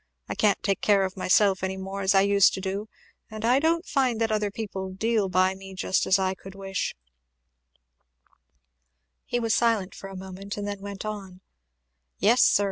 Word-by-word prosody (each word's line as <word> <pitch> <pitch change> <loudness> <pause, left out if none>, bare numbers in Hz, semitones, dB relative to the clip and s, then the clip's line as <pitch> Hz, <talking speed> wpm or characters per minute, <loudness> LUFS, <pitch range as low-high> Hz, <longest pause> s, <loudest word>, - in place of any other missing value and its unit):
I - - -3
can't 210 -2 +1
take 195 -2 0
care 200 -2 +3
of 190 - -5
myself 190 +1 +3
any 190 0 -2
more 195 +1 -5
as 195 +1 +2
I 195 - +6
used 200 0 +4
to - - -5
do, 195 +3 -4 0.4
and 215 0 -5
I 250 +3 +4
don't 330 +3 +1
find 255 -5 +1
that 225 -1 +1
other 210 -1 0
people 195 -3 -5
deal 210 +1 0
by 185 +1 +3
me 195 0 -11
just 185 - 0
as 190 - +5
I 190 -1 0
could 190 +1 -12
wish 195 -1 -3 1.5
" 60 -1 -49
He 245 - 0
was 225 -2 0
silent 225 -5 +1
for 195 - -9
a 195 - -9
moment 190 +2 -7
and 205 0 -4
then 200 -1 -5
went 200 0 -7
on, 195 -3 -6 0.8
"Yes 235 +5 +4
sir! - - +5
195 Hz, 195 wpm, -26 LUFS, 190-215 Hz, 1.5 s, I